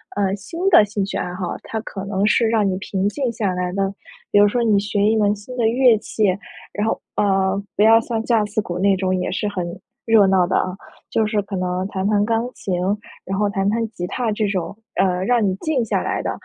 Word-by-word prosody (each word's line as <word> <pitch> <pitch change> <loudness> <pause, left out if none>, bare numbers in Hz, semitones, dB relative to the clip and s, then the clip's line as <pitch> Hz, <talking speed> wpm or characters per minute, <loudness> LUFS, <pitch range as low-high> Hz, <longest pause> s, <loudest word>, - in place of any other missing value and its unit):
呃， 195 -2 +1
新 270 - -9
的 215 - +7
兴 205 -1 -2
趣 195 - -3
爱 180 - -3
好， 180 -1 -4
它 220 -1 -4
可 195 -3 -7
能 195 0 0
是 225 +2 +3
让 220 -3 +2
你 185 - -1
平 195 0 -1
静 255 +1 -2
下 215 -4 -1
来 180 0 -2
的。 195 0 0 0.4
比 - - +3
如 205 - +7
说 240 +4 0
你 210 -3 +3
学 205 0 -1
一 215 +2 +3
门 205 -1 +2
新 210 +5 -10
的 230 - +2
乐 240 -1 +4
器， 215 0 -1 0.5
然 210 +1 -2
后， - - -1
呃， 195 -1 +1 0.2
不 - - 0
要 225 +1 +7
像 225 -1 -3
架 225 -3 +2
子 210 +1 -1
鼓 175 -3 -5
那 195 +1 +3
种 185 0 -1
也 180 - -2
是 205 +3 -2
很 185 -4 -3 0.4
热 220 -3 +5
闹 190 -2 +4
的 180 - -1
啊， 185 0 0 0.3
就 220 - +1
是 215 -1 0
可 200 0 -6
能 180 +1 -2
弹 190 0 -2
弹 205 -1 +2
钢 230 +2 0
琴， 180 -2 -3 0.5
然 195 - -3
后 205 0 +1
弹 195 -1 -1
弹 225 +2 0
吉 180 -5 -5
他 230 +5 -2
这 210 0 0
种， 195 0 -3 0.2
呃， 185 -1 +1
让 240 0 +2
你 185 - 0
静 265 +3 -1
下 225 - -1
来 - - -1
的。 - - -3
205 Hz, 255 characters per minute, -21 LUFS, 190-220 Hz, 0.5 s, 的